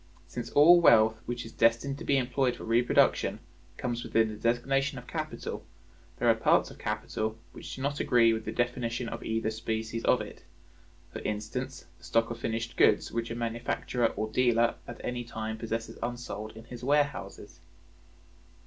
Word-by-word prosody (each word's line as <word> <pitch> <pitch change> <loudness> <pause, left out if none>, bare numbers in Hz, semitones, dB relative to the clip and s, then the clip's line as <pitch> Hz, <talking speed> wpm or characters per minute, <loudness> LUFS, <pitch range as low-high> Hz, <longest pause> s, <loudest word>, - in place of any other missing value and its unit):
Since 120 +7 -6
all 170 +4 +8
wealth 110 -6 +6
which 120 -1 -4
is 115 - -9
destined 115 +6 +2
to - - -7
be 140 - +2
employed 125 0 +1
for - - -10
reproduction 115 +2 +2 0.4
comes 120 -1 -2
within 115 -1 +2
the - - -5
designation 135 +5 0
of 125 - -8
capital, - - -5 0.5
there 120 - 0
are 115 - +7
parts 110 - +2
of - - -14
capital 110 0 -3
which - - -8
do 130 - -6
not 145 +1 -1
agree 115 -2 +4
with 110 0 -3
the 110 - -4
definition 120 0 -1
of - - -6
either 110 0 -1
species 110 +1 -3
of 125 - +4
it; 105 - -8 0.7
for - - -5
instance, 115 +5 -4
the - - -23
stock 115 0 +1
of 115 - -6
finished 115 0 -3
goods - - +4
which 115 0 -2
a 115 - -4
manufacturer 120 +1 -1
or 110 - -2
dealer 120 -1 +3
at 120 - -8
any 125 0 -2
time 110 -1 -5
possesses 115 0 -4
unsold 115 -3 -5
in 110 - -10
his 120 +1 -10
warehouses. 130 - -1
115 Hz, 175 wpm, -29 LUFS, 110-125 Hz, 0.7 s, all